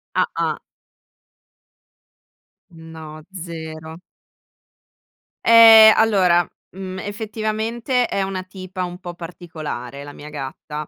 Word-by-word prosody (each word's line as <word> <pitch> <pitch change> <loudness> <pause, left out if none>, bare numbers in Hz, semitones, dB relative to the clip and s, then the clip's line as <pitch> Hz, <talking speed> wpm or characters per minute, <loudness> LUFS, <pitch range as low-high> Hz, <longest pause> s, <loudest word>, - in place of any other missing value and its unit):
Ah-ah. - - -1 2.1
No, 160 -2 -11
0. 160 -2 -8 1.5
Ehm, 225 -1 +9
allora, 185 -6 +3 0.2
mhmm, 185 0 -7
effettivamente 220 +4 -2
è 200 - -2
una 190 -1 -4
tipa 185 0 -7
un 180 0 -6
po' 175 -2 -8
particolare 155 -6 -8
la 145 0 -10
mia 150 +1 -11
gatta. 150 +1 -7
180 Hz, 90 wpm, -20 LUFS, 160-210 Hz, 2.1 s, Ehm